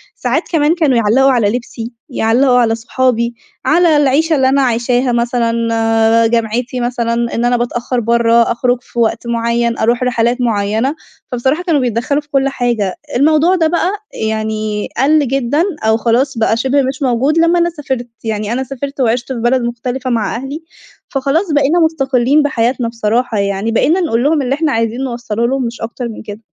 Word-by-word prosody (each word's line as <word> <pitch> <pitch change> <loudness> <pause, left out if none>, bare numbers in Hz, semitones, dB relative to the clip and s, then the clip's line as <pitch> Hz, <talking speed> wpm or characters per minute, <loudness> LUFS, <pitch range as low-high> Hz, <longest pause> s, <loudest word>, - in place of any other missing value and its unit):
ساعات - - -1
كمان 315 0 +2
كانوا 300 -8 +2
يعلّقوا 240 +5 +3
على 230 -5 +2
لبسي، 235 0 -5 0.2
يعلّقوا 250 +1 +2
على 225 -2 +2
صحابي، 235 0 0 0.3
على 330 -1 +4
العيشة 295 +3 +2
اللي 265 -2 +3
أنا 275 +1 +2
عايشاها 245 +1 +1
مثلًا، 235 0 0 0.8
جامعتي 235 +2 -1
مثلًا، 240 -1 -1 0.2
إن 235 - 0
أنا 245 0 +2
باتأخر 240 +1 -2
برّه، 235 0 +3
أخرج 245 +1 +1
في 240 - -8
وقت 230 +1 0
معيّن، 235 0 0
أروح 235 +3 +1
رحلات 245 0 0
معيّنة. 220 +4 0 0.4
فبصراحة 265 +7 0
كانوا 325 -6 +1
بيتدخّلوا 250 +4 -1
في 295 - -30
كل 275 -1 +1
حاجة. 235 -7 -1 0.2
الموضوع 310 +7 +3
ده 330 -3 +2
بقى 345 +2 0 0.4
يعني 215 -1 -2
قَل 285 +3 +3
جدًا 270 +4 0 0.2
أو 220 0 +3
خلاص 240 +3 0
بقى 225 0 +1
شِبه 265 +4 +1
مش 270 +3 -3
موجود 270 +4 +1
لمّا 335 +1 +3
أنا 340 0 +2
سافرت. 270 -7 -4 0.2
يعني 215 0 -2
أنا 260 +2 -1
سافرت 275 +1 -6
وعِشت 240 +1 0
في 240 - -5
بلد 240 +2 +1
مختلفة 245 +2 -3
مع 230 -4 -1
أهلي، 270 +6 -6 0.5
فخلاص 290 +7 0
بقينا 295 +3 +2
مُستقلّين 280 -3 +2
بحياتنا 245 -3 0
بصراحة 230 0 -1
يعني، 200 +2 -1
بقينا 315 +10 +2
نقول 240 -9 0
لهم 300 +1 +2
اللي 265 0 0
إحنا 310 0 0
عايزين 230 +2 -1
نوصّله 235 -3 -2
لهم 265 0 -1
مش 235 +1 -6
أكتر 235 +2 -5
من 220 - -9
كده. 210 0 -9
245 Hz, 170 wpm, -15 LUFS, 230-275 Hz, 0.8 s, على